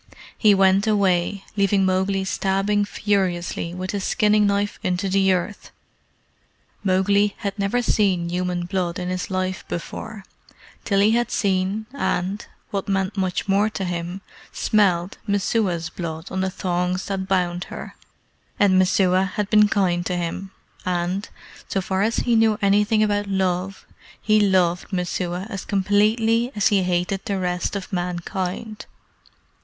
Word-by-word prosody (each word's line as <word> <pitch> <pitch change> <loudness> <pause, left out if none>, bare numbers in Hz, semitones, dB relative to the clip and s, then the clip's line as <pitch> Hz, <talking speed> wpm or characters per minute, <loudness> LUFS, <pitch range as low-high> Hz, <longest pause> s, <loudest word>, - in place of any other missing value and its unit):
He 210 -3 +5
went 195 +2 +4
away, 195 -2 +1
leaving 195 -1 +2
Mowgli 190 +1 +1
stabbing 195 +2 +1
furiously 185 -5 -1
with 185 +1 -4
his 200 -2 -3
skinning 210 -2 +3
knife 200 +1 0
into 185 -1 -1
the 195 0 +3
earth. 185 +2 -2 1.1
Mowgli 200 +2 +2
had 205 -1 -4
never 210 +5 0
seen 190 -6 +1
human 180 0 -2
blood 180 -1 -2
in 180 0 -3
his 185 0 -3
life 185 0 -2
before 195 +4 -6 0.6
till 200 -2 +2
he 210 +2 +5
had 240 +1 +1
seen, 195 +2 0
and 190 -4 -1 0.3
what 195 -2 -3
meant 195 0 0
much 190 -2 -1
more 200 +2 +3
to 195 -3 -4
him 175 +2 -4 0.3
smelled 190 -4 +1
Messua's 195 -4 0
blood 160 -1 -6
on 190 - -1
the 190 - 0
thongs 180 0 -2
that 190 -1 -3
bound 180 -2 0
her. - - -8 0.7
And 190 -2 +5
Messua 185 0 +3
had 210 -2 -2
been 210 -1 +6
kind 180 -4 +1
to 180 - -1
him, 175 +3 -4 0.3
and, 180 +2 -2 0.4
so 195 - -1
far 190 +1 -1
as 225 +3 +1
he 240 -1 +3
knew 225 -1 +4
anything 210 +2 +3
about 205 -1 0
love, 190 0 -1 0.3
he 215 -1 +3
loved 185 -3 +2
Messua 180 0 -2
as 195 -2 -4
completely 220 +4 +2
as 210 - +3
he 200 -3 +3
hated 180 +2 -1
the 200 -4 -1
rest 180 +1 -2
of 195 0 -6
mankind. 180 +4 -4
195 Hz, 145 wpm, -22 LUFS, 180-205 Hz, 1.1 s, been